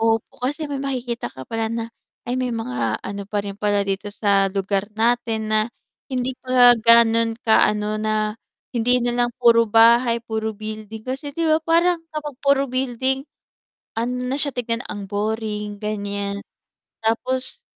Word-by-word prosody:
Opo, 225 +1 0
kasi 290 +5 -2
may 275 -1 -3
makikita 250 -4 -3
ka 130 - -10
pala 225 +5 -2
na, 230 0 -3 0.4
ay 245 - -2
may 250 -2 -1
mga 125 - -2
ano 200 0 -5
pa 210 - -1
rin 200 -1 -6
pala 205 -1 +1
dito 195 +1 -3
sa 200 -1 +2
lugar 195 +1 -1
natin, 230 -1 +1
na 215 - +4 0.5
hindi 255 0 -1
pa 250 -1 +6
ganon 230 0 +5
ka 220 - +5
ano 210 0 -2
na 215 0 0 0.4
hindi 245 +1 +2
nalang 240 0 +1
puro 230 -2 +5
bahay, 230 +2 +5
puro 220 -2 -3
building. 215 0 -7
Kasi, 270 +3 -4
di 335 - 0
ba, 315 0 +3
parang 335 +2 +2
kapag 305 -2 -5
puro 280 -1 +3
building, 260 +1 -1 0.8
ano 240 +2 -1
na 260 +2 -1
siya 285 - +1
tignan, 235 -1 -2
ang 205 -1 -5
boring 210 0 -2
gan'yan 200 -1 -3 0.6
tapos 255 - -1
230 Hz, 155 wpm, -22 LUFS, 210-250 Hz, 0.8 s, pa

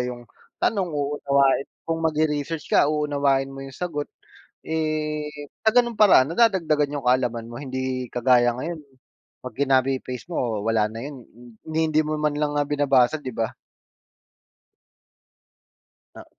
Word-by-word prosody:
'yong 125 -1 -4 0.3
tanong, 195 -4 0
uunawain 140 -2 +1 0.2
kung 165 0 -2
magre-research 155 -1 -1
ka, 145 - +5
uunawain 140 -3 +1
mo 135 - -8
'yong 135 -1 -9
sagot. 155 -5 -3 0.6
Eh, 155 -1 -2 0.3
sa 220 - +4
ganung 240 0 +3
paraan, 200 -11 +6
nadadagdagan 165 -6 +2
'yong 140 -4 -4
kaalaman 120 -2 +1
mo. 120 - -10
Hindi 130 -1 -4
kagaya 125 0 +3
ngayon, 160 +2 -5 0.6
'pag 125 - -9
kinopy-paste 130 0 0
mo, 120 -11 -2
wala 110 -1 +1
na 115 - -7
'yon, 135 0 -8 0.4
ni 160 0 0
hindi 155 0 +2
mo 155 0 -3
man 150 -1 0
lang 150 0 0
nga 145 - 0
binabasa, 140 -2 +3
'di 145 -4 -6
ba? 115 -1 -3 2.6
Oo. - - -10
145 Hz, 135 wpm, -24 LUFS, 130-155 Hz, 2.6 s, paraan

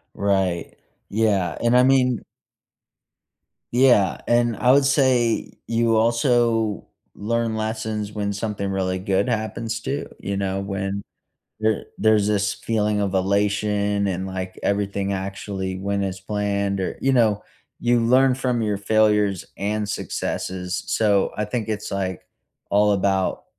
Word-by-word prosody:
Right. 95 -4 0 0.4
Yeah. 100 -7 +1
And 120 +1 +4
I 125 - +6
mean 130 -2 +3 1.5
Yeah. 120 -7 +4
And 120 -1 +2
I 125 - +4
would 140 0 +5
say 130 -4 +2 0.2
you 115 0 +2
also 115 -2 +2 0.3
learn 115 +1 -1
lessons 110 -1 -3
when 100 -1 -2
something 100 -1 -3
really 95 -1 -1
good 95 +2 0
happens 115 0 -2
too, 140 +5 -3
you 100 +1 -3
know? 95 0 -1
When 100 0 -3 0.6
there 110 -1 0
there's 110 -2 +3
this 100 -1 +1
feeling 105 -2 0
of 100 -2 -1
elation 100 +1 +1
and, 95 0 -2
like, 95 0 -5
everything 100 0 -1
actually 95 0 -4
went 100 +1 -1
as 95 -1 -4
planned 100 -1 -1
or 95 - -3
you 135 0 +2
know, 110 -5 +3 0.4
you 120 0 +2
learn 130 +3 +4
from 125 -3 -1
your 105 -2 0
failures 105 -2 +2
and 105 +1 -2
successes. 90 -2 -3
So, 100 -3 +2
I 105 - -1
think 110 +1 -3
it's, 110 -1 -3
like, 95 -3 -3 0.5
all 105 +1 +4
about 95 -1 0
105 Hz, 135 wpm, -23 LUFS, 100-115 Hz, 1.5 s, I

